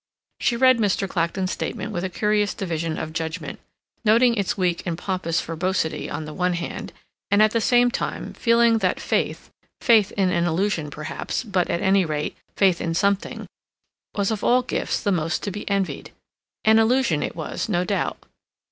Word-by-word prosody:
She 235 - +1
read 255 -1 +5
Mr. 200 -2 +1
Clacton's 185 +2 -1
statement 210 - -4
with 175 -3 -3
a 190 - -1
curious 210 +2 +1
division 165 -3 -3
of 155 0 -5
judgment, 160 -1 -4 0.4
noting 235 +3 +5
its 200 -3 -1
weak 180 -3 0
and 170 -2 -3
pompous 180 -3 -1
verbosity 165 0 -2
on 155 +1 -4
the 155 - -7
one 180 +1 0
hand, 170 0 -5 0.4
and, 200 +1 +3
at 215 0 +5
the 230 - +1
same 245 +1 +4
time, - - -4
feeling 230 -1 +3
that 185 -3 0
faith, - - -2 0.3
faith 220 -4 +4
in 190 -3 +1
an 170 -1 +1
illusion, 175 -2 0
perhaps, 155 +10 -4
but, 195 -6 0
at 170 - -1
any 195 0 +4
rate, 150 -2 -3 0.2
faith 190 -4 +3
in 165 0 -2
something, 200 +2 0 0.7
was 200 +1 0
of 215 -2 -3
all 250 +1 +4
gifts - - -2
the 205 - 0
most 165 -2 -1
to 200 - -2
be 205 +2 -6
envied. 195 -2 -2 0.5
An 220 0 +6
illusion 225 - +2
it - - -3
was, 165 +6 -4
no 175 -3 +1
doubt. 195 -1 -1
190 Hz, 180 wpm, -23 LUFS, 170-215 Hz, 0.7 s, An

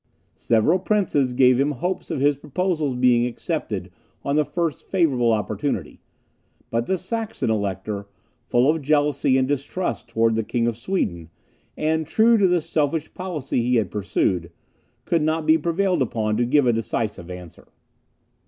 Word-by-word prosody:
Several 120 +11 +2
princes 170 -11 +1
gave 125 0 +4
him 145 +2 +2
hopes 180 +8 -3
of - - -2
his 145 +1 +3
proposals 155 -1 -1
being 125 -1 +3
accepted 115 - -4 0.3
on 140 - 0
the 150 - +4
first 165 0 -3
favourable 135 -11 +2
opportunity; 105 -3 -2 0.7
but 115 +1 -1
the 190 - +1
Saxon 220 - -2
Elector, 100 -1 -3 0.4
full 120 +2 +2
of 160 +1 +2
jealousy 145 -2 +2
and 130 0 +2
distrust 145 +3 -3
towards 115 -1 +1
the 115 - 0
King 115 +2 -1
of 120 -1 0
Sweden, 105 - -2 0.5
and 160 0 0
true 225 +1 +4
to 195 - +5
the 175 -1 +2
selfish 155 +1 -1
policy 160 -9 -3
he 125 +2 +1
had 105 -6 +1
pursued, 90 -4 -1 0.5
could 165 -2 +1
not 155 +1 0
be 160 - +6
prevailed 175 +1 0
upon 110 -3 0
to 120 - +2
give 140 +3 +3
a 120 - +3
decisive 110 -5 -3
answer. 90 -2 -10
135 Hz, 155 wpm, -23 LUFS, 115-165 Hz, 0.7 s, be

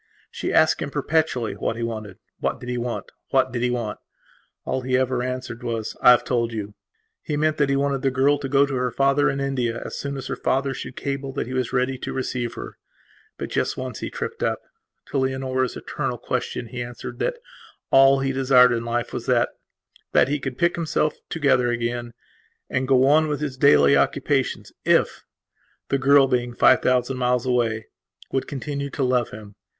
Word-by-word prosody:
She - - -3
asked - - +4
him - - -2
perpetually 140 -7 0
what - - -2
he 115 - -4
wanted. 110 -5 -5 0.2
What - - -1
did 120 - -8
he 125 - -2
want? 120 0 -4 0.2
What 130 -1 +2
did 120 -1 -3
he 125 - +1
want? 120 -4 -3 0.7
And - - -2
all 130 - 0
he 130 0 +1
ever 130 -1 0
answered 125 -1 -4
was: 115 -3 -3
"I - - +7
have 125 - +6
told 120 -2 0
you". 105 -2 -5 0.5
He 150 -3 -3
meant 155 +1 +1
that 145 -2 +2
he 140 - +2
wanted 140 -1 0
the 135 - +2
girl 135 +3 +2
to 135 -2 -4
go 140 +1 +4
to 140 - -5
her 125 -1 0
father 140 +3 +2
in 135 - -2
India 125 -4 -1
as - - -6
soon 140 -1 -4
as 135 - -6
her - - -3
father 135 +1 0
should 130 0 -7
cable 140 -1 -3
that - - -2
he 130 - -6
was 130 -2 -1
ready 130 0 0
to - - -5
receive 120 -2 -3
her. - - -8 0.6
But - - -6
just - - -1
once 130 -2 -5
he - - -4
tripped - - -5
up. - - -1 0.5
To 140 - +1
Leonora's 130 -1 -1
eternal - - -3
question 120 - -3
he 125 -1 -5
answered 120 0 -7
that - - -1 0.5
all 135 0 +6
he 135 0 0
desired 130 -1 +5
in 115 -1 -1
life 120 0 -2
was - - -5
thatthat 130 - -1
he 145 +1 0
could 130 -2 -5
pick 170 0 +2
himself 155 -2 0
together 135 -5 +2
again 120 0 -3 0.6
and 130 0 0
go 130 -1 +4
on 155 +3 +4
with 150 -1 -2
his 145 -3 -3
daily 70 - +5
occupations 70 0 0
ifthe - - +2 0.8
girl, 140 +1 +6
being 120 -2 -1
five 130 - +5
thousand 130 +1 +1
miles 125 0 +1
away, 115 -3 0 0.5
would 135 - -1
continue 140 0 -4
to 140 - -2
love 125 -2 +1
him. 105 -1 -11
130 Hz, 195 wpm, -23 LUFS, 120-135 Hz, 0.8 s, I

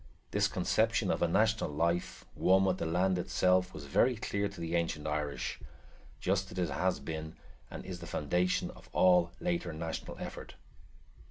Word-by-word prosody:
This - - +3
conception - - +1
of - - -1
a 85 - +4
national 110 +3 +2
life, 85 +4 -1
one 95 +1 +4
with 95 -1 +1
the 85 - -1
land 90 +2 +2
itself, 90 +1 +2
was 75 -4 -8
very 120 - +3
clear 100 -3 -1
to 100 -2 -11
the 85 0 -3
ancient 80 -3 -1
Irish, 75 -1 -2 0.6
just 95 +1 0
as 90 - -9
it 90 -3 0
has 95 0 +1
been 80 -1 -5 0.3
and - - -8
is 90 -2 -6
the 85 - -8
foundation 90 +4 0
of - - -16
all 90 -2 +5
later 85 0 -1
national 80 +1 -5
effort. - - -7
90 Hz, 170 wpm, -32 LUFS, 80-95 Hz, 0.6 s, all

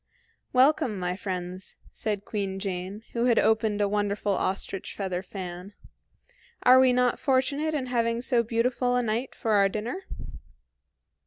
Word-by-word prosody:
"Welcome, 255 -4 +3
my 180 -1 -1
friends," 185 -1 -5 0.2
said 210 -2 -3
Queen 195 -3 -3
Jane, 195 +2 -4
who 235 0 +1
had 240 -2 +3
opened 220 -1 +2
a 205 - +3
wonderful 205 0 0
ostrich 195 0 -2
feather 185 -3 -2
fan. 185 0 -7 0.9
"Are 255 +1 +8
we 260 -1 +6
not 250 -1 +2
fortunate 280 +4 +1
in 270 -4 -1
having 230 -2 0
so 245 -1 +2
beautiful 240 +2 0
a 250 - +2
night 230 +3 -2
for 225 - -2
our 200 -2 +5
dinner?" 235 - -4
215 Hz, 145 wpm, -27 LUFS, 195-250 Hz, 0.9 s, Are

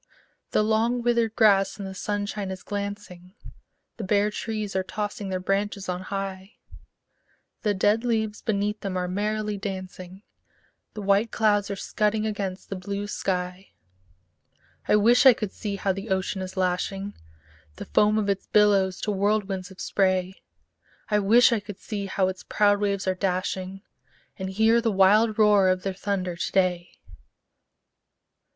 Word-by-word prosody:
The - - +2
long 225 +3 +1
withered 235 -2 +1
grass 195 -3 +4
in 200 - -6
the 190 - -6
sunshine 205 0 -3
is 190 -1 -7
glancing, 200 -2 -6 0.6
The 225 - -5
bare 205 +1 +2
trees 215 -2 -4
are 190 - +2
tossing 205 +1 -4
their 185 -1 -2
branches 195 +1 -2
on 180 0 -3
high; 195 +1 -5 1.1
The 210 -2 0
dead 205 +4 +2
leaves 220 -3 -1
beneath 210 0 -1
them 190 -2 -3
are 180 0 -1
merrily 210 +2 -2
dancing, 185 -1 -7 0.7
The 210 - -5
white 200 +3 +3
clouds 205 -2 +2
are 200 - -2
scudding 215 +2 -1
across 200 -3 -4
the 195 - -6
blue 200 +2 -4
sky 180 -2 -3 1.1
I - - +4
wish 235 +6 +5
I 260 - +10
could 215 -3 -4
see 205 -2 -4
how 195 -1 0
the 195 +4 -7
ocean 190 0 -1
is 185 +1 -7
lashing 190 +2 -1 0.6
The - - -8
foam 210 +1 +3
of 210 -2 0
its 200 -1 -1
billows 200 -3 +3
to 210 - -1
whirlwinds 200 -2 -1
of 190 - -15
spray; 185 -1 0 0.7
I 210 - +4
wish 230 +6 +5
I 230 - +2
could 205 -1 -9
see 200 -1 -5
how 190 0 +1
its 185 0 -4
proud 205 -1 +2
waves 200 -2 -1
are 185 - +2
dashing, 185 +1 -3 0.6
And 190 0 -3
hear 220 +4 +3
the 230 -1 +1
wild 210 +3 +4
roar 210 -3 +5
of 185 0 0
their 195 - -2
thunder 185 -2 -3
to 170 - -3
day! 180 -2 0
200 Hz, 160 wpm, -25 LUFS, 190-210 Hz, 1.1 s, I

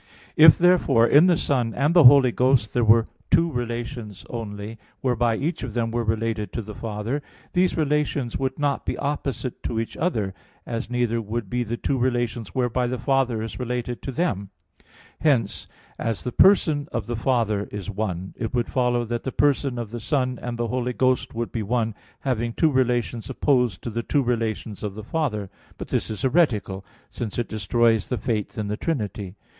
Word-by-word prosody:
If 155 0 +8
therefore 170 -10 +4
in 145 +8 +6
the 175 -3 +4
Son 125 -8 0
and 145 +5 +2
the 175 -5 +7
Holy 130 -1 +8
Ghost 125 -3 +2
there 120 - +2
were 115 +1 +5 0.2
two 165 0 +3
relations 120 -4 -5
only, 110 -1 -6 0.2
whereby 120 -3 +1
each 160 +8 -2
of - - -6
them 115 -1 0
were 120 0 -1
related 110 -1 -1
to 115 - -3
the 105 +1 -8
Father, 110 +6 -3 0.3
these 180 0 +2
relations 150 -5 0
would 130 -1 -2
not 145 -2 0
be - - -3
opposite 140 -3 -3
to 115 - -2
each 115 - -4
other, 110 - -1 0.3
as 115 0 -4
neither 120 -2 0
would 110 -1 -4
be 125 0 0
the 120 +1 -4
two 135 +1 -1
relations 120 -3 -1
whereby 125 -1 +1
the 125 +1 -2
Father 125 -3 +1
is 115 - -6
related 125 -1 -3
to 135 - -5
them. 120 - -1 0.7
Hence, 125 -10 +1 0.3
as 115 -2 -2
the 125 - -3
person 155 - +4
of 115 -4 -2
the 120 - -3
Father 110 -4 +1
is 105 0 -5
one, 95 -3 -3
it 115 +2 -4
would 120 -1 -1
follow 125 -2 +1
that 120 0 -3
the 130 - -3
person 140 -3 +1
of 115 -3 -5
the 120 - -5
Son 125 0 -1
and 120 - -4
of - - -8
the 120 0 -1
Holy 125 +1 -1
Ghost 130 -1 +1
would 115 0 -3
be 115 - -2
one, 115 +1 0 0.3
having 120 -3 -1
two 160 +4 +2
relations 120 -3 0
opposed 125 -6 +1
to 120 - -4
the 115 +2 -2
two 140 +4 +1
relations 115 -3 -2
of 105 -2 -4
the 110 - -7
Father. 115 -7 -2 0.3
But - - -7
this - - -1
is 110 -2 -5
heretical 120 - +1 0.3
since 110 -4 -5
it 120 - -1
destroys 110 +1 +1
the 125 - -1
Faith 110 -5 -2
in 105 -1 -2
the 105 +1 -2
Trinity. 105 - -3
120 Hz, 195 wpm, -24 LUFS, 110-130 Hz, 0.7 s, If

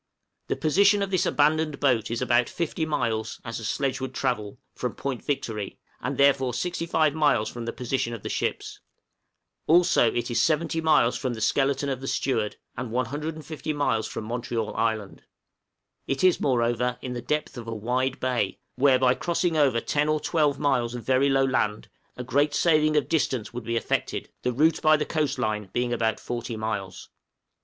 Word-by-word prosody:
The - - 0
position 200 +6 +3
of 195 - -4
this 185 - +2
abandoned 150 0 +2
boat 125 -6 +2
is 115 +2 -2
about 125 -1 +2
50 160 -1 -2
miles 110 -7 -1
as 115 -1 -4
a - - -8
sledge 135 +4 -1
would 130 0 -5
travel 105 -6 -2 0.2
from - - -4
Point 135 -3 -4
Victory, 110 -8 -3 0.2
and - - -3
therefore 135 -3 +3
65 165 -1 0
miles 145 -8 +2
from 120 -1 -7
the 115 - -2
position 125 -1 -2
of 115 -4 -7
the - - -4
ships; - - -3 0.9
also 165 -8 +5
it 120 +1 -2
is 115 0 +2
70 160 +2 +1
miles 150 -7 +3
from 130 -2 -2
the - - -7
skeleton 135 +5 +1
of 135 -2 -3
the 135 - -6
steward, 110 -7 -1 0.2
and 125 -1 -4
150 150 +5 -3
miles 115 -7 0
from - - -5
Montreal 115 -1 -3
Island; 110 -3 -1 0.9
it 135 +4 -1
is 185 -2 +5
moreover 125 -1 +1
in 125 - -4
the 120 - -4
depth 150 +3 -2
of 120 -2 -8
a 115 - -4
wide 125 +5 -1
bay, 125 -2 -1 0.2
where, 135 -1 +5
by 130 -1 +4
crossing 170 +2 -1
over 140 -6 +3
10 150 +5 0
or 155 0 +2
12 150 -3 +1
miles 125 -5 0
of 120 - -6
very 130 +4 +3
low 135 0 +3
land, 105 -5 -1 0.3
a 125 - -4
great 145 +4 +1
saving 155 -2 +3
of 150 - +1
distance 130 -7 -1
would 120 -2 -6
be 115 - -2
effected, - - -2
the 125 - 0
route 155 +7 +2
by 155 0 +5
the 150 - -1
coast 150 -4 -1
line 105 -4 -2
being 120 0 0
about 115 -1 0
40 120 -1 -5
miles. 105 -4 -4
130 Hz, 185 wpm, -26 LUFS, 115-150 Hz, 0.9 s, also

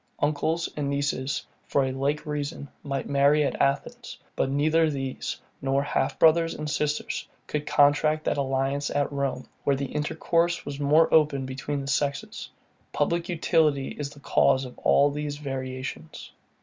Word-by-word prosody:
Uncles 155 +3 0
and 145 -2 -2
nieces, 140 -1 -1 0.2
for 140 - +2
a 130 - -1
like 140 +3 -1
reason, 145 -1 -4
might 140 -2 -3
marry 140 +2 +4
at - - -1
Athens; 140 +1 -1 0.2
but - - 0
neither 155 +3 +3
these, 135 -3 -4 0.2
nor 135 +1 +1
half 145 - -1
brothers 165 +1 +4
and 150 - -5
sisters, 150 0 -2 0.2
could 150 -1 -3
contract 150 +2 +3
that - - 0
alliance 135 +1 0
at 145 0 0
Rome, 140 -2 -2 0.2
where 140 - +2
the 140 +1 -2
intercourse 165 +3 0
was 145 -1 -6
more 150 +3 +4
open 150 -4 +3
between 135 +2 -4
the 135 - -7
sexes. 140 0 -2 0.4
Public 170 +4 0
utility 160 -5 +2
is 145 -1 -5
the 145 0 -14
cause 135 -1 +3
of 125 - -10
all 145 +1 +4
these 145 0 -4
variations. 130 - -6
145 Hz, 155 wpm, -26 LUFS, 135-150 Hz, 0.4 s, marry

